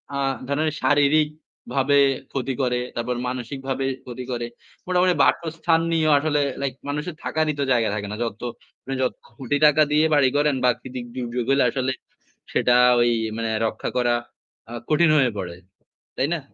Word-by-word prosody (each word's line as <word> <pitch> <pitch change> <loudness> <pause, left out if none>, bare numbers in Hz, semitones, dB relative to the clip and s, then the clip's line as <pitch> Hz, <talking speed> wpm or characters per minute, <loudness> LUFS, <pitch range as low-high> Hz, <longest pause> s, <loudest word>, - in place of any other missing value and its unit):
আ - - -1 0.3
ধরেন 150 +3 0
শারীরিকভাবে 145 -2 +1 0.3
ক্ষতি 135 0 -2
করে, 125 -1 +1 0.2
তারপর 120 +1 -2
মানসিকভাবে 135 +2 -4 0.2
ক্ষতি 125 0 -7
করে। 120 -1 -2 0.4
মোটামুটি 180 0 +3
বাসস্থান 165 0 +1
নিয়েও 160 -2 +2
আসলে 150 0 +1 0.2
লাইক 135 -2 -1 0.2
মানুষের 150 +3 -3
থাকারই 155 -1 0
তো - - +2
জায়গা 115 -2 +2
থাকে 100 -1 -4
না। 105 - -4
যত 115 -2 -5 0.6
যত 130 - +1 0.2
কোটি 135 +2 -1
টাকা 150 +1 +5
দিয়ে 150 +1 +4
বাড়ি 135 -3 +4
করেন 145 -1 +2
প্রাকৃতিক 125 0 -1
দুর্যোগ 120 -1 -3
হলে 140 - +4
আসলে 130 -1 -1 0.6
সেটা 125 0 +3 0.2
ওই 120 0 +4 0.3
মানে 115 0 -2 0.2
রক্ষা 110 - -4
করা 120 -1 +2 0.6
আ - - -8 0.2
কঠিন 160 +2 +4
হয়ে 130 -3 +3
পড়ে। 90 -3 -5 0.6
তাই 135 - 0
না? 165 - -3
135 Hz, 150 wpm, -23 LUFS, 125-150 Hz, 0.6 s, টাকা